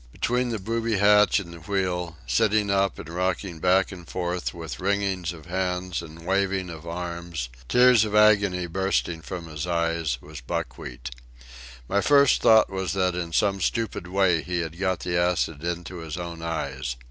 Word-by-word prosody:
Between 125 - 0
the 115 - -2
booby 115 +2 -1
hatch 105 +1 +5
and 85 -3 -8
the 85 - -10
wheel, 90 -2 -2
sitting 100 - +2
up 100 -1 +1
and - - -8
rocking 90 0 -2
back 95 +3 +3
and 90 -3 -10
forth 90 -1 -2
with 80 -2 -7
wringings 95 -2 0
of 80 -4 -11
hands 90 -1 -2
and 85 0 -11
wavings 95 -1 0
of 80 0 -10
arms, 85 -5 -5 0.2
tears 125 -2 +6
of 105 -1 -2
agony 100 -4 +4
bursting 90 -2 -1
from 85 +1 -6
his 75 +1 -5
eyes, 85 -5 0
was - - -10
Buckwheat. - - -5 0.8
My 100 +1 +1
first 140 +1 +5
thought 110 -2 +6
was 95 0 -2
that 90 -2 +1
in 85 -1 -4
some 100 +2 +1
stupid 110 -2 -1
way 90 -3 +2
he 90 -1 -2
had 80 +1 -6
got 95 -3 0
the 85 - -2
acid 85 -3 0
into 85 +1 -4
his 80 0 -6
own 85 -2 -6
eyes. 70 -6 -3
90 Hz, 170 wpm, -25 LUFS, 85-100 Hz, 0.8 s, tears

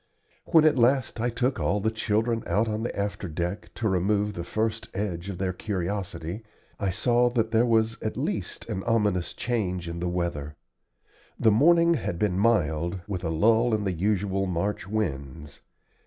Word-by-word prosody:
When 160 -2 +5
at 150 -4 +4
last 125 -1 +2
I 120 - +1
took 125 +2 -1
all 105 - +1
the 110 +2 0
children 110 +1 0
out 110 +3 +1
on 110 0 -2
the 120 - -2
afterdeck, 90 -2 -3
to 115 - -1
remove 100 +2 +1
the 85 - -5
first 110 +4 -2
edge 95 -2 -3
of 95 - -5
their 95 0 -1
curiosity, 95 -1 -4 0.4
I 100 - 0
saw 120 +5 +2
that 115 -2 0
there 115 +2 +3
was 115 -1 +1
at - - -3
least - - -3
an 95 - -3
ominous 105 -6 +1
change 95 -8 -2
in 85 0 -5
the 90 +1 -1
weather. 85 -4 -3 0.8
The 110 - +5
morning 170 +9 +5
had 115 - -2
been 95 -1 0
mild, 85 -5 +1
with 95 -3 -4
a 80 - -1
lull 110 +8 +3
in 105 - -2
the 95 -2 -1
usual 95 +1 0
March 90 +2 -2
winds. 75 -8 -4
105 Hz, 170 wpm, -26 LUFS, 90-115 Hz, 0.8 s, When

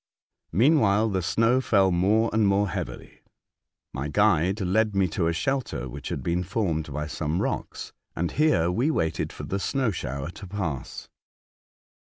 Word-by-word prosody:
Meanwhile, 110 - +3
the 95 -2 -1
snow 115 +8 +2
fell 100 -6 +3
more 105 +6 +2
and 110 -2 +3
more 100 0 +2
heavily. - - -6 0.7
My 70 +3 -3
guide 95 +3 +2
led 105 +2 +1
me 95 -1 +3
to 80 +1 0
a - - +2
shelter 95 - -2
which 70 +3 -7
had 65 - -4
been 85 +4 0
formed 85 -6 -2
by 75 +2 -3
some 75 +2 -2
rocks, - - -4 0.2
and 85 0 -1
here 95 - +2
we 120 - +1
waited 80 - -1
for - - -9
the 100 - -2
snow 130 +2 0
shower 70 -2 -4
to 100 0 -10
pass. 85 -8 -5
95 Hz, 160 wpm, -26 LUFS, 80-110 Hz, 0.7 s, Meanwhile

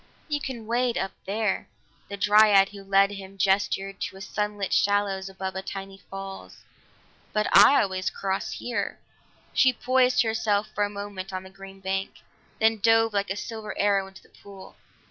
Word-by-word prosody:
"You 295 -2 -2
can 245 -6 -6
wade 240 +1 0
up 190 - -2
there," 210 0 -1 0.4
the 200 - -5
dryad 205 -1 +5
who 200 -1 -11
led 195 +1 +3
him 195 -1 -9
gestured 195 +1 0
to 190 - -4
a - - -11
sun 210 +1 -3
lit 195 -2 -2
shallows 200 -1 +1
above 190 -1 -5
a 190 - -3
tiny 195 0 -7
falls 195 - -9 0.7
"but 210 0 +1
I 210 +8 +8
always 185 -1 -2
cross 195 0 -3
here." 245 - -3 0.6
She 260 - +5
poised 255 0 +2
herself 215 -2 0
for 205 - 0
a 205 - 0
moment 200 -2 -7
on 185 0 -4
the 190 - -13
green 195 0 -12
bank, 190 0 -2 0.4
then 220 0 +3
dove 225 +1 +4
like 200 -1 0
a 190 - -1
silver 215 0 -6
arrow 200 -1 +2
into 190 0 -15
the - - -23
pool. 195 -1 -14
200 Hz, 175 wpm, -26 LUFS, 195-215 Hz, 0.7 s, I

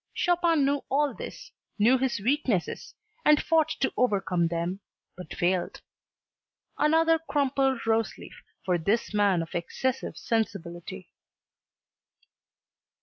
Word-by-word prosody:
Chopin 340 -4 +2
knew 280 0 +1
all 290 +1 +1
this, - - -9 0.3
knew 240 +5 +4
his 260 -4 0
weaknesses, 235 - -1 0.3
and 300 0 +5
fought 320 -2 +2
to 265 - +1
overcome 185 -8 +1
them 170 +3 -3 0.4
but 180 - -9
failed. 180 +1 0 1.0
Another 325 +2 +3
crumpled 275 -5 0
roseleaf 225 0 -1 0.3
for 180 -2 +1
this 205 +7 0
man 200 -5 +2
of 165 - -11
excessive 260 +9 -3
sensibility. 185 -4 -4
230 Hz, 105 wpm, -27 LUFS, 185-285 Hz, 1.0 s, and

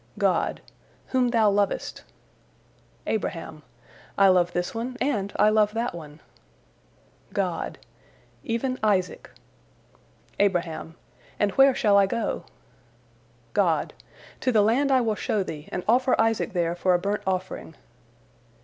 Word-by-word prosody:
God: - - +1 0.5
"Whom 255 -1 +2
thou 225 -3 +3
lovest." 200 -1 -1 1.0
Abraham: 165 -7 -3 0.6
"I 195 -1 +6
love 180 -1 +3
this 175 0 -2
one 240 +3 -4
and 215 -7 -1
I 210 - +4
love 215 0 +2
that 235 +2 -1
one." 155 -2 -10 1.1
God: - - -2 0.7
"Even 255 +3 -2
Isaac." 190 -5 0 1.1
Abraham: 170 -4 0 0.4
"And 205 -1 +1
where 270 +3 +5
shall 205 -2 +3
I 200 -1 +5
go?" 230 +3 -2 1.1
God: - - +1 0.5
"To 255 - +1
the 215 -3 +4
land 265 +6 +2
I 260 -1 +4
will 225 -2 +1
show 210 -1 -1
thee, 150 -4 -8
and 180 - -3
offer 255 +3 +3
Isaac 225 -1 +1
there 170 -2 0
for 180 +1 +2
a - - +1
burnt 200 +3 -2
offering." 185 -3 -3
205 Hz, 125 wpm, -25 LUFS, 180-230 Hz, 1.1 s, I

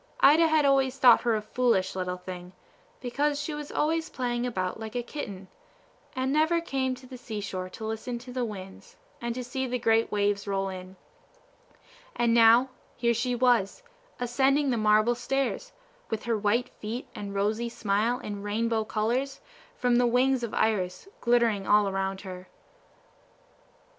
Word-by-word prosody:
Ida 315 +4 +7
had 315 -2 +3
always 270 -1 +3
thought 250 -3 +7
her 235 -2 +1
a 215 - -2
foolish 215 -5 +1
little 180 -1 -2
thing, 180 0 -9 0.5
because 285 +4 0
she 295 +1 -3
was 295 -1 -6
always 320 +2 0
playing 245 -1 -2
about 185 -4 -3
like 220 +1 -7
a 245 - -1
kitten, 200 -8 -7 0.7
and 260 +1 0
never 315 +3 +3
came 265 -6 -1
to 255 +1 -14
the 255 -1 -10
sea 220 -3 -5
shore 185 -2 -5
to 220 - -8
listen 220 +2 -4
to 250 +1 -10
the 250 -1 -1
winds, 195 -4 -8 0.3
and 235 +1 -3
see 260 +1 -3
the 250 0 -1
great 225 -1 +2
waves 205 0 0
roll 195 -1 -1
in; 185 0 -8 1.2
and 235 -1 +2
now 235 +3 +6 0.3
here 235 -1 +2
she 245 +2 -1
was, 245 - +2 0.4
ascending 270 +3 +2
the - - +1
marble 215 +1 +3
stairs, 270 - -2 0.4
with 220 -1 -3
her 235 -1 0
white 220 +4 +1
feet, 225 +4 -5
and 200 -1 -6
rosy 215 +4 0
smile, 220 +2 0
and 205 -1 -5
rainbow 220 +2 0
colors, 240 +6 -1 0.4
from 245 -1 +2
the 245 0 +4
wings 255 +2 +2
of 235 -2 -3
Iris, 185 - 0
glittering 235 -5 +2
all 210 -1 +5
around 195 0 -2
her. 185 -1 -9
235 Hz, 165 wpm, -27 LUFS, 205-255 Hz, 1.2 s, Ida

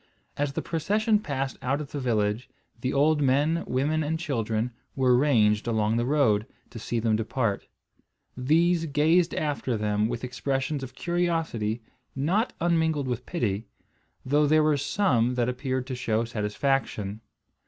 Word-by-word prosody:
As 145 -1 -1
the - - -3
procession 210 +6 +1
passed 135 -7 -3
out 135 +3 0
of 150 -2 -7
the 145 - -3
village, 110 -2 0 0.3
the 130 +2 -1
old 150 +2 +3
men, 145 +5 +2
women, 145 +5 0
and 155 +2 -1
children 115 -7 -1 0.2
were 130 -2 +4
ranged 115 -6 +3
along 110 -1 +1
the 120 +1 0
road, 115 -8 +2 0.2
to 115 - -8
see 120 - -3
them 110 -1 +2
depart. 110 -1 -1 0.7
These 165 +6 +2
gazed 160 +4 +3
after 140 -5 -1
them 105 +1 0
with 120 0 -4
expressions 135 +3 -2
of 130 -1 -8
curiosity, 165 -11 -1 0.3
not 180 - +1
unmingled 160 -4 +1
with 125 0 -3
pity, 110 - -2 0.6
though 145 +3 +3
there 155 +1 +4
were 155 -1 +3
some 135 - +1
that 120 -1 +1
appeared 130 0 -2
to 130 - -5
show 115 -3 0
satisfaction. 110 -1 -1
135 Hz, 150 wpm, -26 LUFS, 115-155 Hz, 0.7 s, were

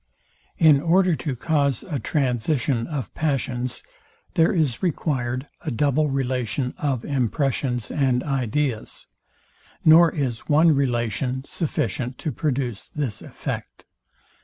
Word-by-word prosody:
In 150 -4 +6
order 180 +2 +3
to 135 -1 -3
cause 140 -1 0
a 150 -6 -2
transition 125 0 0
of 145 -6 -4
passions, 130 -5 -2 0.5
there 165 +3 +4
is 155 - 0
required 130 -6 -1 0.2
a 160 - -2
double 145 +3 +1
relation 130 -1 -1
of 135 -5 -1
impressions 130 -2 -1
and 130 -3 +1
ideas, 135 -2 -2 0.8
nor 165 +1 +8
is 130 -7 -3
one 160 +3 +6
relation 125 -1 0
sufficient 125 - -2
to 155 - -3
produce 125 -6 -2
this 140 -8 -3
effect. - - -6
135 Hz, 110 wpm, -23 LUFS, 125-150 Hz, 0.8 s, nor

